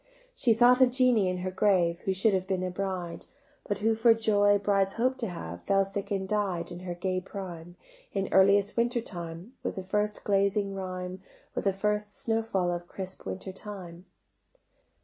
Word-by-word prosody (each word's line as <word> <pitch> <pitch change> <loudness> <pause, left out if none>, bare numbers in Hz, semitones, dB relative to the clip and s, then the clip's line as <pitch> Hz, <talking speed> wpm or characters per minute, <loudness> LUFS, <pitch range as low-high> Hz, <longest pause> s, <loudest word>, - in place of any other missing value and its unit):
She 240 - +3
thought 245 +2 +6
of 255 - +7
Jeanie 250 -5 +3
in 180 - -2
her 185 - -1
grave, 180 -4 +2
Who 190 - +1
should 200 +3 +3
have 190 -1 0
been 190 -1 -1
a 185 - -2
bride; 180 -2 -4 0.4
But 205 - -1
who 225 - +4
for 225 +1 +5
joys 205 -2 +3
brides 195 -1 +2
hope 255 +3 +1
to 230 - -1
have 85 - -7
Fell 195 0 +3
sick 195 +1 -5
and 195 -1 -1
died 195 -4 -1
In 175 - -7
her 180 -1 -5
gay 185 +1 -1
prime, 175 -3 -8 0.4
In 195 -1 -1
earliest 200 +1 +5
winter 235 +1 +1
time 175 0 -7
With - - -3
the 190 - -5
first 210 +2 -1
glazing 200 0 +1
rime, 185 -1 -5 0.3
With - - -3
the 195 - +4
first 210 +1 -2
snow 225 -1 0
fall 190 -6 0
of 175 0 -4
crisp 190 0 -7
winter 190 0 -5
time. 185 -3 -9
195 Hz, 190 wpm, -29 LUFS, 185-210 Hz, 0.4 s, of